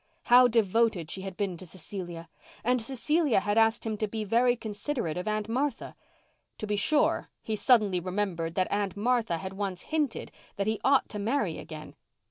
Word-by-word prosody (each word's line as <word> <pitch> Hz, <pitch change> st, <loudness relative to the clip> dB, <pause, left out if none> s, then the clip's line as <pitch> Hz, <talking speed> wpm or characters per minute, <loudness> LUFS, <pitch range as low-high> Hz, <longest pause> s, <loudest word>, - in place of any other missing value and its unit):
How 250 Hz, +1 st, +7 dB
devoted 220 Hz, -6 st, +1 dB
she 190 Hz, -, -4 dB
had 190 Hz, -2 st, -7 dB
been 195 Hz, -4 st, -2 dB
to 185 Hz, -, -10 dB
Cecilia! 175 Hz, -1 st, -7 dB, 0.4 s
And 250 Hz, +1 st, +2 dB
Cecilia 270 Hz, -, +1 dB
had 205 Hz, +1 st, -1 dB
asked 225 Hz, +1 st, +2 dB
him 220 Hz, -1 st, -2 dB
to 215 Hz, -, -1 dB
be 220 Hz, +1 st, -4 dB
very 240 Hz, +4 st, +3 dB
considerate 220 Hz, -, -3 dB
of 180 Hz, +3 st, -4 dB
Aunt 215 Hz, 0 st, -1 dB
Martha. 265 Hz, +5 st, -2 dB, 0.6 s
To -, -, -4 dB
be 210 Hz, 0 st, -1 dB
sure, 295 Hz, +9 st, +2 dB
he 220 Hz, -, -2 dB
suddenly 210 Hz, -5 st, +4 dB
remembered 180 Hz, -3 st, -2 dB
that 185 Hz, -1 st, 0 dB
Aunt 200 Hz, -2 st, -1 dB
Martha 225 Hz, -5 st, +1 dB
had 190 Hz, +3 st, -6 dB
once 195 Hz, -2 st, -4 dB
hinted 295 Hz, -7 st, -1 dB, 0.2 s
that 200 Hz, -, -1 dB
he 220 Hz, 0 st, -1 dB
ought 275 Hz, 0 st, +4 dB
to 210 Hz, -, -5 dB
marry 215 Hz, -, -1 dB
again. 155 Hz, -1 st, -9 dB
210 Hz, 180 wpm, -28 LUFS, 190-235 Hz, 0.6 s, How